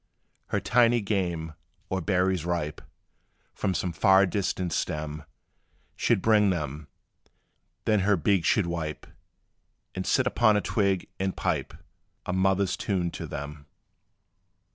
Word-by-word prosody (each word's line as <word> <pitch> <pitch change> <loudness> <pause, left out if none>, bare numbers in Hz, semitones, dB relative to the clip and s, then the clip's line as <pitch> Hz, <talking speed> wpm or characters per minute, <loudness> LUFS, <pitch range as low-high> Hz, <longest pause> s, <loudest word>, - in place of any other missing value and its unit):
Her - - 0
tiny 120 0 +3
game, 90 -6 -2 0.3
or 95 0 -2
berries 90 0 +1
ripe 85 -3 -2 0.7
From 95 -3 -1
some 90 - -1
far 95 +5 +5
distant 90 -2 -2
stem 75 0 -3 0.7
She - - +2
'd 95 - -6
bring 105 -2 +4
them; 75 -4 -3 1.0
then 105 -1 +3
her 100 +1 +3
beak 95 +2 +2
she 100 - +3
'd - - -5
wipe, 80 -3 -4 0.9
And 95 0 -4
sit 130 - +3
upon 115 -4 +3
a - - +1
twig, 100 -4 0
and 95 0 -2
pipe - - -2 0.5
A 90 - -2
mother's 95 +1 +2
tune 90 -4 -1
to - - -6
them. 75 0 -7
95 Hz, 135 wpm, -27 LUFS, 80-100 Hz, 1.0 s, far